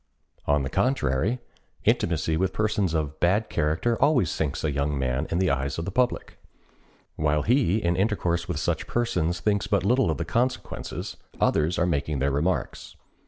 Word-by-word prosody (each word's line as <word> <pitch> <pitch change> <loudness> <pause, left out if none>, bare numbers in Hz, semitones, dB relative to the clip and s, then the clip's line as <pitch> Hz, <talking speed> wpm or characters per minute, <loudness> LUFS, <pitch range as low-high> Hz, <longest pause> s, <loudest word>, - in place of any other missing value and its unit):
On 70 -1 +2
the 65 - -3
contrary, 100 - +1 0.5
intimacy 80 -1 +1
with 95 +3 0
persons 105 -5 0
of 75 -1 -2
bad 100 +6 +2
character 80 +11 0
always 125 - +3
sinks 75 -4 -2
a 75 - +1
young 70 +1 -1
man 65 +3 -1
in 85 - -1
the 95 -3 +2
eyes 70 0 -1
of 80 - -3
the 100 - -3
public. 125 +4 -1 0.8
While 75 -1 +1
he, 120 -5 +3
in 85 -5 0
intercourse 90 -4 0
with 90 -5 -2
such 80 +1 -1
persons, 90 -9 0
thinks 100 -2 +1
but 100 -3 +1
little 125 +5 +3
of - - 0
the - - -3
consequences, 125 +2 -2 0.2
others 80 +3 +2
are 85 - +2
making 75 -3 -1
their 70 +2 +1
remarks. 75 +1 -2
85 Hz, 170 wpm, -26 LUFS, 75-105 Hz, 0.8 s, always